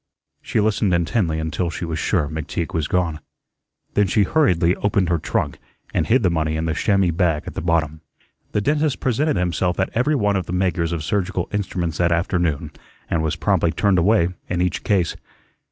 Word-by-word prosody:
She - - -1
listened 105 -3 +2
intently 85 -1 0
until 80 +2 -2
she 85 +2 -4
was 80 -1 -3
sure 85 -4 +1
McTeague 80 +2 -4
was 80 -2 0
gone. 85 -4 0 0.7
Then 105 -1 +3
she 105 +2 +3
hurriedly 90 - +2
opened 100 -3 +1
her 85 -2 +1
trunk - - -2 0.3
and 80 - 0
hid 120 +1 +3
the 90 - +3
money 80 -1 0
in 80 - -2
the 80 - 0
chamois 95 0 +2
bag 80 -3 +1
at - - -7
the - - -4
bottom. 80 -2 0 0.5
The 105 - +1
dentist 150 +3 +1
presented 140 +5 +1
himself 90 0 0
at 95 - 0
every 130 +6 +2
one 105 -6 +1
of 95 -3 -2
the 90 - -4
makers 90 -2 0
of 85 -3 -3
surgical 95 0 -1
instruments 90 -5 -2
that 85 -1 +3
afternoon 85 -3 0 0.4
and 80 - +1
was 80 -1 -1
promptly 85 -1 +1
turned 95 +2 +2
away 90 -1 +3 0.2
in 90 - -1
each 90 -1 -1
case. 95 -5 +1
90 Hz, 190 wpm, -21 LUFS, 80-100 Hz, 0.7 s, Then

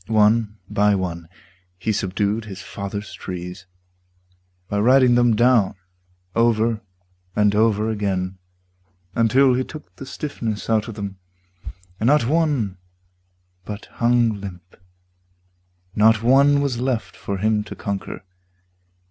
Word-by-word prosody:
One 110 0 +3
by 105 0 +2
one 85 -3 -4 0.5
he 90 +5 -1
subdued 105 +2 -1
his 95 -3 -8
father's 100 +1 -6
trees 90 +1 -7 1.0
By 100 - -1
riding 125 +3 +5
them 120 -2 +4
down 120 -4 +3 0.6
over 115 -1 +2 0.5
and 105 -1 +3
over 110 0 +2
again 95 -3 -2 0.7
Until 125 +4 +4
he 130 +1 +1
took 155 +3 -11
the 135 - -8
stiffness 115 -9 -4
out 110 -1 +2
of 115 - -7
them, 100 -2 -6 0.8
And 110 - +1
not 145 -2 +4
one 140 - 0 0.8
but 105 +1 -7
hung 115 -3 +2
limp, 90 -2 -10 1.2
not 110 +1 +4
one 140 +3 +5
was 135 -4 -1
left 125 -2 -2
For 100 - -4
him 105 +2 +1
to - - -8
conquer. 100 -2 -5
110 Hz, 120 wpm, -22 LUFS, 100-120 Hz, 1.2 s, riding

